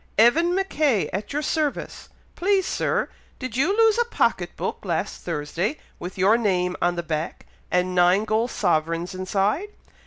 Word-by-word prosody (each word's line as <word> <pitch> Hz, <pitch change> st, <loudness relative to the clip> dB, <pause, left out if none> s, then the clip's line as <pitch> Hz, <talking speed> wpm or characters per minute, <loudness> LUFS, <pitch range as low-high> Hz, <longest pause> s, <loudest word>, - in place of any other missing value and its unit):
"Evan 325 Hz, -, +5 dB
Mackay, 305 Hz, -, +1 dB
at 200 Hz, +3 st, -4 dB
your 295 Hz, +2 st, -1 dB
service. 305 Hz, -3 st, -2 dB, 0.3 s
Please, 385 Hz, +1 st, +2 dB
Sir, -, -, 0 dB, 0.3 s
did 255 Hz, -4 st, -6 dB
you 330 Hz, -, +2 dB
lose 450 Hz, 0 st, +4 dB
a 475 Hz, -, +3 dB
pocket 475 Hz, -, 0 dB
book -, -, -3 dB
last -, -, -2 dB
Thursday, 170 Hz, -, -2 dB, 0.2 s
with 180 Hz, +2 st, -7 dB
your 200 Hz, +5 st, +4 dB
name 180 Hz, -4 st, +1 dB
on 175 Hz, 0 st, +2 dB
the 170 Hz, -, -3 dB
back, 155 Hz, 0 st, -4 dB, 0.2 s
and 180 Hz, 0 st, +1 dB
nine 180 Hz, +3 st, +4 dB
gold 220 Hz, +3 st, +1 dB
sovereigns 165 Hz, -2 st, 0 dB
inside?" 195 Hz, -, 0 dB
210 Hz, 155 wpm, -24 LUFS, -, 0.3 s, Evan